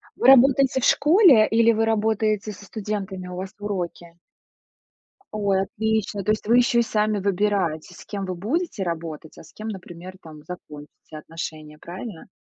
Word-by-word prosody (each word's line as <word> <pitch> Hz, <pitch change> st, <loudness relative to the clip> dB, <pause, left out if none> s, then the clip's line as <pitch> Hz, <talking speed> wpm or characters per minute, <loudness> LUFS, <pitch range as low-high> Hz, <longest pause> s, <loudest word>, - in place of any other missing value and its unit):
Вы 245 Hz, -, +1 dB
работаете 270 Hz, 0 st, +6 dB
в -, -, +1 dB
школе 300 Hz, -, +5 dB
или 230 Hz, +1 st, +4 dB
вы 225 Hz, 0 st, +1 dB
работаете 215 Hz, -1 st, 0 dB
со 205 Hz, 0 st, -12 dB
студентами? 195 Hz, -3 st, -5 dB
У 180 Hz, -, -7 dB
вас 190 Hz, +1 st, -6 dB
уроки? 175 Hz, -4 st, -5 dB, 1.2 s
Ой, 200 Hz, -2 st, +1 dB
отлично. 215 Hz, 0 st, -2 dB
То 210 Hz, -, +1 dB
есть 215 Hz, -, -2 dB
вы 235 Hz, +2 st, +5 dB
ещё 240 Hz, -1 st, +3 dB
и -, -, +5 dB
сами 215 Hz, -2 st, 0 dB
выбираете, 190 Hz, -4 st, -1 dB
с -, -, -14 dB
кем 200 Hz, -2 st, -5 dB
вы 185 Hz, -1 st, -4 dB
будете 235 Hz, -, -2 dB
работать, 160 Hz, -3 st, -6 dB
а -, -, -12 dB
с -, -, -17 dB
кем, 215 Hz, -, -8 dB
например, 185 Hz, -3 st, -8 dB
там, 155 Hz, -2 st, -13 dB
закончите 150 Hz, -3 st, -11 dB
отношения, 155 Hz, -1 st, -8 dB
правильно? 180 Hz, +3 st, -9 dB
200 Hz, 165 wpm, -23 LUFS, 175-220 Hz, 1.2 s, работаете